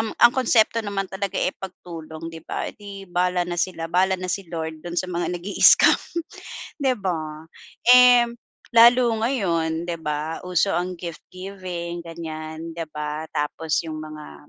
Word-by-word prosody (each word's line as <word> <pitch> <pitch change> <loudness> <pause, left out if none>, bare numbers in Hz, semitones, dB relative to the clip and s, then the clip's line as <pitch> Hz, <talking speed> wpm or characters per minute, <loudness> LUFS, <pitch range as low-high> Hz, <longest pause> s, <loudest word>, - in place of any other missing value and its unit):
um, 220 0 -1
ang 240 - +7
konsepto 230 -3 +3
naman 200 -2 -2
talaga 195 0 -3
eh, 185 - +1
pagtulong, 165 -4 -9
di 165 - -9
ba? - - -4
'Eh, - - -7
di 200 -1 -9
bahala 180 0 0
na 175 0 -4
sila, 170 -3 -2
bahala 185 +3 +2
na 185 - -5
si 195 -4 -4
Lord 160 -2 -5
dun 175 0 -6
sa 185 - -2
mga 175 0 -1
nag-i-scam, 190 +4 +5 0.8
di 265 -2 +2
ba? 160 -5 -4 0.4
Eh, 250 -1 +8 0.5
lalo 240 +2 +8 0.2
ngayon 170 -9 0
di 170 - -3
ba, 150 +1 -3
uso 180 +2 +1
ang 180 +1 -1
gift-giving, 175 0 -7
ganyan, 160 -1 -7
di 170 - -4
ba? 150 +1 -4
Tapos 155 +1 -2
yung 155 -1 -5
mga 150 - -11
175 Hz, 155 wpm, -23 LUFS, 160-195 Hz, 0.8 s, Eh